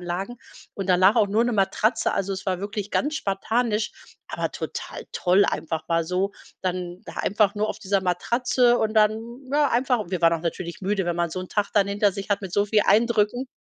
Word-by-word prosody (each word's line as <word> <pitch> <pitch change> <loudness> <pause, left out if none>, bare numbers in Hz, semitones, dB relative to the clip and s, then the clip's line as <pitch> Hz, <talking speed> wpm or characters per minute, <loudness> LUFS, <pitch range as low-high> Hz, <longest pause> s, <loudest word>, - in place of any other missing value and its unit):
Sanitäranlagen, 185 +7 -4 0.3
und 195 -1 -5
danach 185 +4 +5
auch 215 -3 +4
nur 215 +4 +2
'ne 245 - 0
Matratze. 215 +2 +1
Also, 195 0 -1
es 190 -1 -6
war 185 -2 0
wirklich 205 +1 -5
ganz 300 +2 0
spartanisch, 215 +1 -1 0.4
aber - - -3
total - - -6
toll 185 +2 +3
einfach 160 0 -2
mal 165 -1 +1
so. 185 +4 -1 0.3
Dann 180 -1 -3
da - - -10
einfach 205 0 +1
nur 210 +1 -1
auf - - -4
dieser 195 0 0
Matratze 240 +7 +2
und 220 0 0
dann, 215 0 +4 0.3
ja, 290 -1 +3
einfach 245 -4 +1
wir 180 -1 -3
waren 165 0 +5
auch 165 - -1
natürlich 170 +1 -4
müde, 195 0 0
wenn 175 0 -1
man 170 0 0
so 185 +3 -5
'n 185 - -8
Tag 205 -1 0
dann 200 -1 +4
hinter 200 0 +1
sich 200 +1 -7
hat 200 - +2
mit 195 -2 -6
so 205 +3 +2
viel 210 +1 +2
Eindrücken 230 +3 +2
200 Hz, 210 wpm, -24 LUFS, 185-220 Hz, 0.4 s, danach